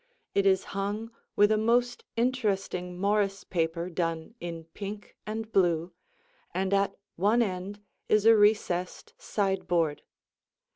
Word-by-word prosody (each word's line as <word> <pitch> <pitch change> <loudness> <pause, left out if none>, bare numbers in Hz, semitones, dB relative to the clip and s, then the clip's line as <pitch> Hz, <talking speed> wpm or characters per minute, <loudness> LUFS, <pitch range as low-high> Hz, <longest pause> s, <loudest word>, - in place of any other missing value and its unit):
It 200 0 +3
is 190 -1 +4
hung 205 +3 -3 0.2
with 205 +1 +5
a 215 - +3
most 240 +2 +1
interesting 195 -7 -1
Morris 200 0 +1
paper 170 0 -1
done 165 +1 -2
in 170 -1 -6
pink 200 +5 -8
and 220 +1 -4
blue, 175 -3 +2 0.6
and 190 +1 0
at 200 0 +2 0.2
one 210 +7 +4
end 195 0 -4 0.3
is 215 0 +4
a 225 0 +8
recessed 205 - +1
sideboard. 185 - 0
195 Hz, 125 wpm, -28 LUFS, 180-215 Hz, 0.6 s, a